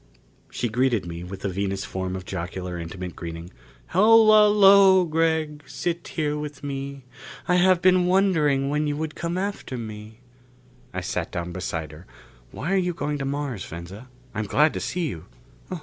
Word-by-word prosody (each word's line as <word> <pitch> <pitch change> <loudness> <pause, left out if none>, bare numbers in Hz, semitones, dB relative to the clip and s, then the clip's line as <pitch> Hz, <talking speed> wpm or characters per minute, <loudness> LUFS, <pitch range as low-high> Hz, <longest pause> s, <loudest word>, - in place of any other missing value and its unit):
She 120 - -2
greeted 120 -2 +1
me 85 0 -6
with 95 +2 -8
the - - -2
Venus 95 +1 -2
form 95 -2 -4
of 95 0 -7
jocular, 90 -1 -5
intimate 90 +2 -6
greeting: 85 +1 -7 0.4
"Hola 215 +2 +6
lo, 195 -2 +7
Gregg! 160 -2 0
Sit 170 -1 -3
here 150 -2 0
with 150 -2 -7
me. 140 -1 -5 0.4
I 180 - +3
have 180 -1 +4
been 185 -1 +4
wondering 160 -8 +2
when 150 +1 0
you 145 0 -2
would 155 0 -3
come 170 +1 -3
after 195 -9 -4
me." 110 -1 -8 0.7
I - - -4
sat - - -3
down 85 0 -4
beside 85 -4 -4
her. 80 +4 -13 0.4
"Why 165 +9 -3
are - - +3
you 180 -2 0
going 145 -1 -2
to 135 - -2
Mars, 140 -6 -3
Venza? 95 +9 -9 0.2
I'm 110 - -2
glad 150 +9 +3
to - - -3
see 175 -2 -2
you." 85 - -7
140 Hz, 170 wpm, -24 LUFS, -, 0.7 s, lo